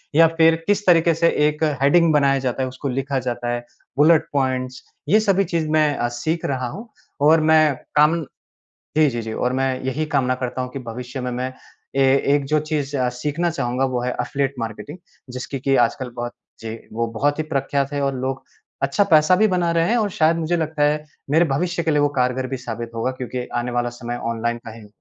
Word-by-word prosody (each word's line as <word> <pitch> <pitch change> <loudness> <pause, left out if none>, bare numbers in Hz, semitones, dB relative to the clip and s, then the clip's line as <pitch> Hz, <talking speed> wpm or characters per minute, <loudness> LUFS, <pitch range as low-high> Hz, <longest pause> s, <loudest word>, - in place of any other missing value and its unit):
या 165 +1 +8
फिर 165 0 +6
किस 205 0 +1
तरीके 170 -2 +5
से 165 +1 +2 0.2
एक 150 +1 -2 0.2
हेडिंग 165 +3 +4
बनाया 140 -2 +3
जाता 125 +1 -1
है, - - -1
उसको 130 +2 -6
लिखा 135 +1 -1
जाता 120 0 -2
है 120 0 -1 0.4
बुलेट 155 +2 +5
पॉइंट्स, 130 -2 -1 0.3
ये 215 - +6
सभी 195 -2 +2
चीज़ 165 -4 -2
मैं 155 -2 +3
अ, 120 - 0
सीख 140 +8 -3
रहा 130 -2 -1
हूँ। 220 - -8 0.3
और 155 +3 +6
मैं 155 -2 +4 0.2
कामन 150 +2 +4 0.7
जी, 155 -2 +5
जी, 120 -1 -3
जी 110 0 -5
और 125 +2 -1
मैं 135 +1 +1 0.2
यही 150 +4 -1
कामना 130 -2 +2
करता 130 0 -3
हूँ 125 - -5
कि - - -5
भविष्य 125 +1 -7
में 125 0 -3
मैं 125 +1 -3 0.5
ए - - +5 0.3
एक 145 -1 +1
जो 155 - +5
चीज़ 145 -2 -1
अ, 125 -1 +1
सीखना 150 +8 -2
चाहूँगा, 130 -4 -1
वो 125 -2 -1
है 125 0 -1
अफ़िलिएट 135 +2 -1
मार्केटिंग, 115 - -6 0.4
जिसकी 130 +2 -5
कि 135 0 +2
आजकल 125 +2 -4
बहुत 120 0 -4 0.3
जी, 110 0 -6 0.2
वो 115 +1 -1
बहुत 145 +1 +1
ही - - +1
प्रख्यात 140 +1 0
है 145 - -1
और 135 -1 0
लोग 130 0 -3 0.4
अच्छा 140 +9 +2
पैसा 155 +3 +5
भी 215 +2 +4
बना 175 -2 +1
रहे 165 0 +2
हैं 240 - +3
और 210 -2 0
शायद 165 -1 +2
मुझे 165 +1 0
लगता 155 -2 -2
है 150 +1 +2 0.3
मेरे 165 +3 +4
भविष्य 175 +3 -1
के 160 - 0
लिए 150 -1 +2
वो 145 - +3
कारगर 125 +1 0
भी 135 - -4
साबित 120 -2 -6
होगा, 115 +3 -1
क्योंकि 125 -1 -5
आने 120 +1 -1
वाला 120 0 0
समय 120 0 -4 0.2
ऑनलाइन 120 +1 -2
का 115 - -7
है। 110 -1 -12
140 Hz, 215 wpm, -21 LUFS, 125-155 Hz, 0.7 s, या